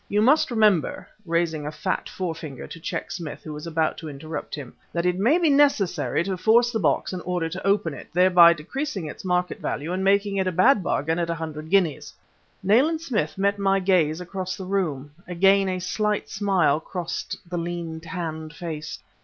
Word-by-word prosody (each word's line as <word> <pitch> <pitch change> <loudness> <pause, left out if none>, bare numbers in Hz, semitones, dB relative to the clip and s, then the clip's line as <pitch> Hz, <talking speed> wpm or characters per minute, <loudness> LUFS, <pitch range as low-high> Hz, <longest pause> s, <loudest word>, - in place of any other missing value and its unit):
You 210 +1 +2
must 295 +6 +4
remember," 215 - +2 0.2
raising 165 -3 0
a - - -3
fat 170 +5 -3
forefinger 160 -7 -5
to 165 - -10
check - - -4
Smith, 165 -5 -6
who 155 - -7
was 150 +2 -7
about 160 -1 0
to 160 - -7
interrupt 150 +2 -6
him, 140 -5 -9 0.2
"that 170 0 -1
it 180 0 +1
may 245 - +4
be 345 -2 +2
necessary 205 - +2
to 190 0 -3
force 235 +5 +4
the 225 - -1
box 195 - +1
in 180 - -4
order 175 -1 -2
to 185 +3 -5
open 195 -6 +2
it, - - -10
thereby 180 -1 +7
decreasing 195 - -4
its 150 - -8
market 180 -1 0
value 155 +5 -3
and 190 +1 -1
making 200 +1 +2
it 190 -1 +1
a - - +1
bad 205 +7 +4
bargain 160 -1 -1
at 170 -1 -1
a 170 - 0
hundred 155 -1 -6
guineas." 180 -6 +1 0.5
Nayland 270 - +3
Smith 240 -10 -2
met 200 +1 +1
my 195 0 +2
gaze 180 -5 +2
across 185 +1 -4
the 190 - -6
room; 160 -8 -2 0.2
again 195 +2 +3
a 185 - -1
slight 210 +3 -1
smile 185 -8 +2
crossed 170 +1 -5
the 175 0 -3
lean, 170 -1 -4
tanned 160 -3 -5
face. 155 -3 -6
180 Hz, 195 wpm, -24 LUFS, 160-195 Hz, 0.5 s, thereby